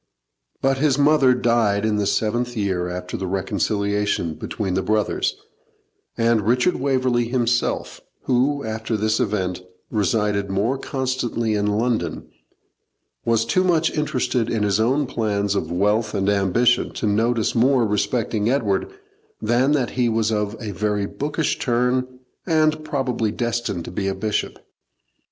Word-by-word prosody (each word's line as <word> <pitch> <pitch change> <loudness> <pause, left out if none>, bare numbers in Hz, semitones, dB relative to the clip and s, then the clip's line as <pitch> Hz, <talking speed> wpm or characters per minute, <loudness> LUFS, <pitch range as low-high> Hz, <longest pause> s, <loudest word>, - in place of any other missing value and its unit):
But 135 0 +2
his 145 -2 +2
mother 145 -3 +4
died 115 -4 +2
in 110 -1 +1
the 100 -1 0
seventh 120 +3 -1
year 95 -4 -1
after 90 0 -5
the 95 - -3
reconciliation 100 -1 -1
between 95 +4 -4
the 95 - +1
brothers, 105 +1 0 0.8
and 115 -1 +3
Richard 125 +9 +2
Waverley 130 -3 +1
himself, 120 0 -1 0.2
who, 135 +3 +1
after 110 0 -2
this 110 +1 +1
event, 95 -4 -1 0.3
resided 105 -1 0
more 110 +8 0
constantly 130 -4 -2
in 105 0 0
London, 110 +3 -1 1.0
was 115 -1 +2
too 185 +10 +2
much 165 -3 +2
interested 125 -5 0
in 110 -2 0
his 100 0 +1
own 130 +6 +2
plans 105 -5 -1
of 85 -5 -2
wealth 105 +4 +1
and 100 0 +1
ambition 100 +5 +2
to - - -3
notice 110 +2 +1
more 125 +1 +3
respecting 110 +1 0
Edward 110 -8 0 0.5
than 120 +6 +2
that 130 -5 0
he 125 -2 +1
was 110 -1 +1
of 105 0 -1
a 110 -4 -5
very 105 +1 -1
bookish 150 +8 -2
turn, 125 +1 +1 0.4
and 155 -2 +2
probably 130 -7 -1
destined 120 -7 -2
to - - -7
be 95 +2 -2
a 95 - -1
bishop. 110 -1 -2
115 Hz, 140 wpm, -22 LUFS, 105-125 Hz, 1.0 s, mother